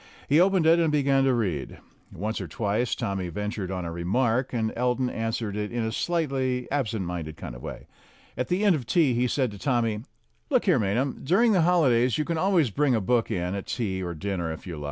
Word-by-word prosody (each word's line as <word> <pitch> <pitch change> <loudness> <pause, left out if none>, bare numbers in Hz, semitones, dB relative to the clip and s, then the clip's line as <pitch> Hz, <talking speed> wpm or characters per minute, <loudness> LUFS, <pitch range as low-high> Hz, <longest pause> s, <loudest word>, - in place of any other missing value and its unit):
He 145 +3 +4
opened 185 -2 +4
it 165 +1 +6
and 165 -2 +2
began 140 -2 +3
to 135 - +3
read. 90 - -2 0.3
Once 105 +5 -3
or - - -5
twice 110 +2 -1
Tommy 95 -2 -3
ventured 105 +1 -4
on 90 -2 -3
a 85 - -4
remark, 115 +9 0
and 110 -3 -1
Elton 125 +1 0
answered 115 -2 -3
in 105 +3 -2
a 110 - -1
slightly 130 -5 -1
absent 115 -8 -1
minded 85 -3 -5
kind - - -7
of - - -10
way. - - -7 0.5
At - - -2
the 190 +4 0
end 195 -4 +5
of 125 -6 -5
tea 145 -1 +3
he 125 +1 +1
said 130 -2 0
to 100 - -10
Tommy: 115 -5 0 0.5
"Look 255 -5 +2
here, 180 -10 +4
Maynham, 115 +7 -1
during 210 - +4
the 185 -4 +4
holidays 130 -9 +3
you 150 - 0
can 165 0 -1
always 175 - +2
bring 140 +1 +2
a - - +2
book 115 +3 +1
in 90 +1 -2
at 100 -1 -5
tea 95 -6 -2
or 85 -2 -4
dinner 85 -1 -3
if 80 - -8
you 85 -4 -6
like." - - -7
120 Hz, 220 wpm, -26 LUFS, 100-145 Hz, 0.5 s, it